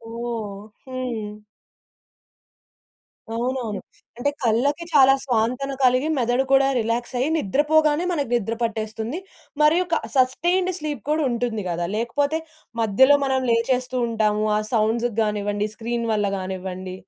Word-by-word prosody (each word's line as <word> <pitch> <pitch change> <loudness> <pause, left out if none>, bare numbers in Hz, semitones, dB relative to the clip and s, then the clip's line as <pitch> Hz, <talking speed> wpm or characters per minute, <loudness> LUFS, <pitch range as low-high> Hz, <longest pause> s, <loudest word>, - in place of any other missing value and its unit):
ఓహ్! 220 -4 -5 0.2
హ్మ్. 240 -5 -5 2.0
అవునవును. 240 -4 -2 0.4
అంటే 285 +4 +1
కళ్ళకి 275 +8 +1
చాలా 270 -2 +7
స్వాంతన 250 +2 0
కలిగి 255 +4 +3
మెదడు 245 +2 +2
కూడా 270 0 +5
రిలాక్స్ 235 +2 -2
అయ్యి, 275 +5 +1
నిద్రపోగానే 300 - +2
మనకు 285 -8 -1
నిద్ర 230 0 -1
పట్టేస్తుంది. 225 +6 -3 0.4
మరియు 330 +4 +4
క - - +5 0.2
సస్టైన్డ్ 345 +8 +2
స్లీప్ 295 -6 -4
కూడా 310 0 +2
ఉంటుంది 230 -3 -2
గద. 170 0 -2 0.2
లేకపోతే 285 +7 0 0.4
మధ్యలో 265 +7 +5
మనం 265 -1 +1
లేచేస్తూ 250 +2 0
ఉంటాము. 215 -1 +1
ఆ - - +1
సౌండ్స్‌కి 225 +1 +1
గానివ్వండి, 205 0 -1
స్క్రీన్ 235 0 -3
వల్ల 210 -1 +1
గానివ్వండి. 185 0 -5
240 Hz, 120 wpm, -23 LUFS, 215-275 Hz, 2.0 s, చాలా